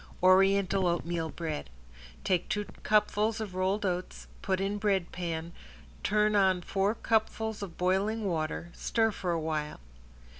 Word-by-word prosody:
~ORIENTAL 195 0 +4
OATMEAL 170 -1 -1
BREAD~ 155 - -4 0.5
Take 180 -2 0
two 210 0 -1 0.2
cupfuls 215 +1 +2
of 210 -4 -5
rolled 190 +3 0
oats, 180 -1 -3 0.2
put 190 -1 0
in 200 +2 -1
bread 195 -4 +1
pan, 170 -2 -4 0.5
turn 210 +1 +2
on 190 -3 +3
four 195 +4 0
cupfuls 220 -1 0
of 190 -4 -7
boiling 200 +4 +1
water, 170 -1 -2
stir 225 -1 +1
for 185 -3 -4
awhile. 155 -2 -2
190 Hz, 135 wpm, -30 LUFS, 175-210 Hz, 0.5 s, ~ORIENTAL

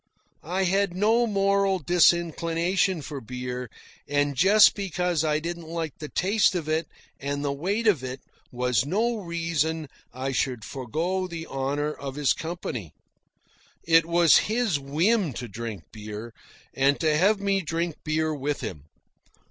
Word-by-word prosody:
I 190 +2 +1
had 195 0 +1
no 225 +5 +3
moral 200 -1 +2
disinclination 170 +1 +2
for 140 -2 -6
beer, 125 +1 -5 0.4
and 145 0 +1
just 200 +9 +6
because 180 -4 -1
I 150 -1 +2
didn't 170 +1 -5
like 165 -2 -4
the 150 -1 -6
taste 195 +1 +2
of 165 -4 -2
it 160 +1 0 0.3
and 140 +1 -3
the 140 - 0
weight 195 +11 -2
of 185 - +3
it 130 +1 -5 0.3
was 125 -2 +1
no 225 - 0
reason 165 -4 -2 0.2
I 130 +2 -3
should 125 -3 -1
forgo 165 +9 -2
the 165 -2 -6
honour 145 +2 -2
of 135 -2 -7
his 145 -2 +2
company. 160 - -5 0.9
It 165 0 +4
was 170 -1 +6
his 220 -9 +1
whim 165 - +1
to 120 +1 -6
drink 110 -4 -6
beer, 110 +1 -8 0.4
and 140 +1 +2
to 155 -2 +2
have 200 +6 +3
me 200 -1 +1
drink 165 -1 -2
beer 155 0 0
with 145 0 -2
him. 90 - -6
160 Hz, 150 wpm, -26 LUFS, 140-185 Hz, 0.9 s, just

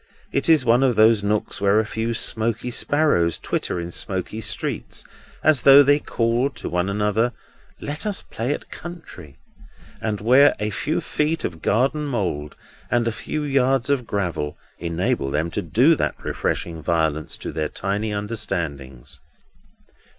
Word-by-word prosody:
It 140 - 0
is 155 -5 +5
one 120 +2 +4
of 130 -3 +3
those 110 -1 +5
nooks 105 -1 -1
where 100 +1 +4
a 110 - +1
few 115 +1 -2
smoky 115 +2 -1
sparrows 130 - +2
twitter - - -2
in 85 0 -5
smoky 95 +5 -2
trees, - - -3 0.4
as 155 -5 +5
though 140 +2 +8
they 145 +1 +4
called 120 +2 0
to - - -6
one 90 +2 0
another, 105 +4 +1 0.5
"Let 150 +8 -5
us 205 -2 -2
play 115 +5 -3
at - - -5
country," 160 - -10 0.6
and 105 -2 -2
where 130 +6 +5
a 105 0 -2
few 150 +10 -1
feet 155 +2 -1
of 80 -2 -5
garden 135 +7 +1
mould 90 - -3 0.3
and 120 -1 +1
a - - +1
few 150 +6 -4
yards 135 -2 +1
of 125 -4 0
gravel 90 -7 -2 0.2
enable 85 -4 -1
them 80 +4 -1
to - - -2
do 120 - +4
that - - -1
refreshing 80 -2 -2
violence 80 -2 -1
to - - -6
their 75 -1 -2
tiny 100 +3 -2
understandings. 85 - -4
110 Hz, 155 wpm, -22 LUFS, 90-135 Hz, 0.6 s, though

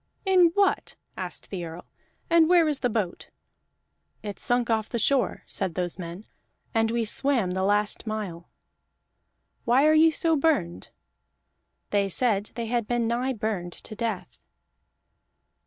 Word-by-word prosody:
"In 370 -2 +6
what?" 400 -2 +1 0.2
asked - - -6
the 185 -3 -4
Earl. 165 +1 -8 0.4
"And 335 -1 +4
where 345 -3 +5
is 295 -3 +1
the 245 - 0
boat?" 210 -6 -3 0.9
"It 205 -2 -6
sunk 245 -1 +1
off 220 -2 0
the 235 - -2
shore," 265 +2 +1
said 185 -4 -4
those 180 0 -3
men, 175 +4 -7 0.5
"and 225 0 +2
we 230 0 0
swam 235 -4 +1
the 190 +1 -1
last 205 +3 0
mile." 200 -6 -5 1.1
"Why 250 +5 +4
are 310 - +5
ye 315 +1 +6
so 325 +1 +1
burned?" 275 - 0 1.0
They 200 -1 +1
said 210 0 +1
they 235 0 -3
had 235 -1 -1
been 240 -1 0
nigh 245 +3 0
burned 205 -6 -3
to - - -9
death. 220 -4 -4
225 Hz, 145 wpm, -26 LUFS, 195-265 Hz, 1.1 s, In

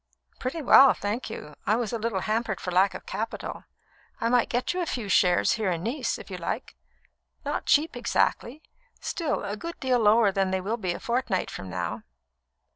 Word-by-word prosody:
"Pretty 290 +5 -3
well, 270 +1 +8
thank 210 +5 -3
you. 150 - -8
I 215 - +4
was 235 -2 -2
a 230 - -1
little 215 -4 -1
hampered 220 -1 -1
for 180 - -4
lack 190 +2 +3
of - - -8
capital. - - -5 0.5
I 230 - +1
might 245 -1 +3
get 245 +7 0
you 365 - -1
a 345 - -2
few 235 -7 -3
shares 180 -2 +4
here 215 -4 -1
in 170 -1 -2
Nice, 245 +8 -1
if - - -11
you - - -4
like; - - -4 0.7
not - - -3
cheap, 300 -1 +3
exactly 245 +3 0 0.4
still, 320 -4 -2
a 200 +1 -3
good 335 +10 -7
deal 255 -2 +2
lower 215 -1 +5
than 195 0 +1
they 190 0 0
will 210 +5 -2
be 185 -6 -2
a - - -7
fortnight 235 -6 -1
from 95 - -7
now." 90 -2 -3
225 Hz, 200 wpm, -27 LUFS, 190-250 Hz, 0.7 s, well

